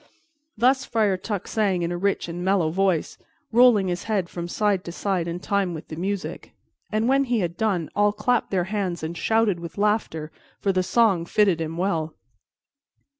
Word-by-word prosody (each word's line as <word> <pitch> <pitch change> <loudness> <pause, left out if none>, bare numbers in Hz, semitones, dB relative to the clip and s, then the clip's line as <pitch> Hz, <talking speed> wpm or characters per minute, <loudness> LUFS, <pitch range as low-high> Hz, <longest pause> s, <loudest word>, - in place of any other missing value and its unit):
Thus 260 +4 +3
Friar 215 -4 +1
Tuck 200 +1 -4
sang 195 -5 0
in 170 - -1
a - - -2
rich 195 +1 0
and 175 +1 -5
mellow 185 -4 +2
voice, 185 -2 0 0.3
rolling 235 -4 +5
his 175 -1 -3
head 200 -6 -1
from 170 -1 -5
side 200 0 0
to 170 - -5
side 180 -1 -1
in 170 +1 -3
time 195 -2 -1
with 160 - -9
the 155 - -6
music, 190 +3 -4 0.4
and 215 +2 +1
when 275 +1 +3
he 240 -4 0
had 170 -1 -2
done, 195 -7 0
all 205 +1 +3
clapped 225 +4 0
their 185 -3 +1
hands 185 -6 -2
and 160 +2 -4
shouted 220 -1 +1
with 170 +2 -8
laughter, 200 -7 0 0.3
for 200 - +1
the 185 -1 +1
song 190 -3 +2
fitted 195 -5 +2
him 160 +1 -4
well. 165 -4 -1
195 Hz, 185 wpm, -24 LUFS, 175-210 Hz, 0.4 s, rolling